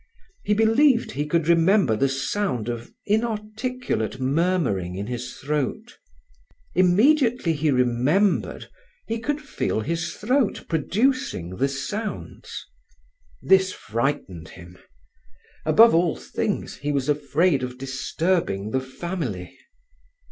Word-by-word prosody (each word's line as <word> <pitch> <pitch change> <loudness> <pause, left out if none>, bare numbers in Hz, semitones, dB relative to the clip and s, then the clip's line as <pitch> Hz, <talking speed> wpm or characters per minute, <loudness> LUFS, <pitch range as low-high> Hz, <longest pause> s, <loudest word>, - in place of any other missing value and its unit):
He 210 - +1
believed 230 +4 +3
he 145 +2 -3
could 165 0 +1
remember 170 - +4
the 135 +5 +1
sound 135 - -2
of 120 0 -5
inarticulate 220 - -2
murmuring 130 - 0
in 100 +2 -4
his 120 +1 -5
throat. 150 - -3 0.7
Immediately 225 - +3
he 155 0 0
remembered, 130 - +1 0.4
he 225 0 -3
could 290 +6 -2
feel 275 - -2
his 165 +8 -3
throat 250 +1 0
producing 180 - 0
the 135 - +2
sounds. 205 +11 -5 0.8
This 190 -1 +4
frightened 110 - -3
him. 90 0 -13 0.9
Above 225 +9 +7
all 170 -1 +3
things, - - -3
he 145 +1 -2
was 140 -2 -1
afraid 150 +1 +2
of 125 0 -5
disturbing 130 - -1
the 130 - 0
family. 130 - -5
160 Hz, 110 wpm, -24 LUFS, 125-210 Hz, 0.9 s, Above